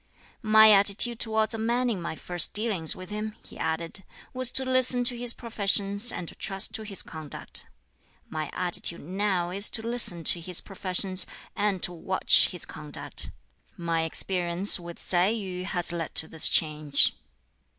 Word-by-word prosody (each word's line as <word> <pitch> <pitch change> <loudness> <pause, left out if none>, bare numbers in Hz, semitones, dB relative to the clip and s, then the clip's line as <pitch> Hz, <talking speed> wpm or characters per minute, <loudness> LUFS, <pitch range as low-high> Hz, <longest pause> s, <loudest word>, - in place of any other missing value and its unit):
"My 220 -1 +7
attitude 205 +4 +2
towards 220 0 0
a 225 - -5
man 240 +3 0
in 210 -7 -2
my 165 - -5
first 175 +2 0
dealings 205 -7 +1
with 185 +2 -11
him," 215 +1 -5
he - - -13
added, 165 +4 -3 0.3
"was 255 -1 +1
to 265 - +6
listen 255 -1 +3
to 245 0 +3
his 240 0 0
professions 205 -1 0
and 175 - -6
to - - -8
trust 195 -1 -1
to - - -2
his 205 -3 -4
conduct. 155 -3 -8 0.6
My 155 -2 -5
attitude 175 -1 -1
now 185 0 -2
is 200 +3 -2
to 225 - -3
listen 230 -8 +3
to 175 - +4
his 180 +1 +2
professions, 185 -1 -1 0.3
and 205 -3 -1
to 175 - -1
watch 185 +3 +3
his 180 - -2
conduct. 150 -1 -5 0.5
My 170 -1 -1
experience 175 +3 +1
with 170 -1 -9
Tsai 180 0 +1
Yu 190 -4 -3
has 175 -3 +3
led 170 -2 -5
to 160 - +1
this 160 -1 +3
change. 150 -2 +2
190 Hz, 165 wpm, -26 LUFS, 170-220 Hz, 0.6 s, My